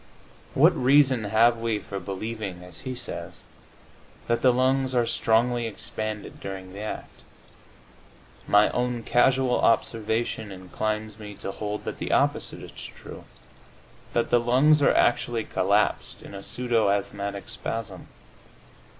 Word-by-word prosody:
What - - +6
reason 130 -3 +4
have 115 +3 +4
we 115 -2 0
for 100 -1 -6
believing, 95 0 -5
as 90 -3 -11
he 130 +6 -5
says, - - -6 0.8
that 120 0 +1
the 130 - +6
lungs 130 +1 +1
are 120 -1 +3
"strongly 120 +1 +2
expanded" 110 -1 -5
during 95 -1 -7
the 100 - -8
act? 105 0 -7 1.3
My 105 +1 +5
own 125 -1 -1
casual 130 +1 +3
observation 110 -1 0
inclines 105 +3 -4
me 105 -1 -8
to 95 - -5
hold 105 +1 -4
that - - -5
the - - -3
opposite - - 0
is - - -10
true, - - -10 0.9
that 120 - 0
the 120 - +5
lungs 135 +6 +4
are 140 - +5
actually 120 -1 +2
collapsed 100 +2 0
in - - -11
a 100 - -7
pseudo 120 -1 +1
asthmatic 100 0 -2
spasm. 115 -2 -5
110 Hz, 135 wpm, -26 LUFS, 100-120 Hz, 1.3 s, What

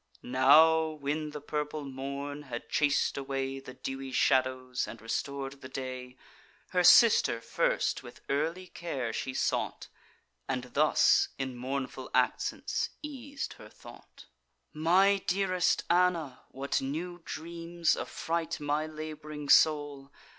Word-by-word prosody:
Now, 155 +6 +6
when 150 0 -3
the 150 0 -7
purple 150 +1 -3
morn 140 +2 -5
had 125 -5 -7
chas'd 145 -1 +2
away 135 0 -3
The 130 -1 -11
dewy 135 0 -6
shadows, 130 -1 +1
and 115 - -9
restor'd 135 +4 -4
the 130 - -9
day, 130 -1 -6 0.5
Her 180 -1 +2
sister 215 - +6
first - - 0
with - - -13
early 160 +6 -1
care 140 -10 -4
she 130 +2 -4
sought, - - -1 0.6
And 125 -1 -3
thus 150 +2 +4
in 130 -2 -4
mournful 130 +2 -4
accents - - 0
eas'd 280 -1 -6
her - - -12
thought: - - -15 0.5
"My 185 +6 +4
dearest 185 -1 +1
Anna, 170 -6 +1
what 135 +1 -2
new 170 +6 -4
dreams 170 +1 -2
affright 165 0 -3
My 150 +1 -1
lab'ring 155 -1 -7
soul! 145 -3 +4
145 Hz, 120 wpm, -30 LUFS, 135-165 Hz, 0.6 s, Now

